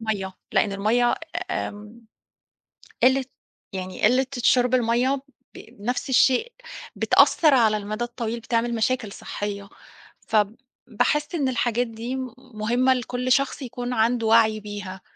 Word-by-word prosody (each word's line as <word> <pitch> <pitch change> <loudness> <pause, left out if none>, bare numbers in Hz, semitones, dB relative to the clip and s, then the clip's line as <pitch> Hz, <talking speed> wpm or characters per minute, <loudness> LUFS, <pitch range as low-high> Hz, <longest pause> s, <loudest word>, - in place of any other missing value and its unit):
المَيّه، 205 -4 -3 0.2
لأن 200 - +2
المَيّه 225 +5 +2 0.4
آمم، 210 - -5 1.0
قلة 260 +1 +4 0.5
يعني 185 -1 -6
قلة 260 +2 +4
شُرب 245 +1 +3
المَيّه، 250 +3 +1 0.3
ب - - -9 0.2
نفس 245 +5 -2
الشيء، 265 - +3 0.4
بتأثِّر 310 -4 +4
على 220 -4 +4
المدى 215 +3 -4
الطويل، 235 -1 -4
بتعمل 235 +1 -1
مشاكل 225 -2 -1
صحية. 200 -1 -6 0.6
فباحِس 255 - -1
إن 280 -5 0
الحاجات 240 -1 0
دي 230 +3 -5 0.4
مهمة 240 +5 +2
لكل 250 0 -3
شخص 275 +1 0
يكون 245 0 -5
عنده 230 0 +1
وعي 220 -1 +4
بيها، 205 -2 -7
235 Hz, 120 wpm, -24 LUFS, 215-255 Hz, 1.0 s, قلة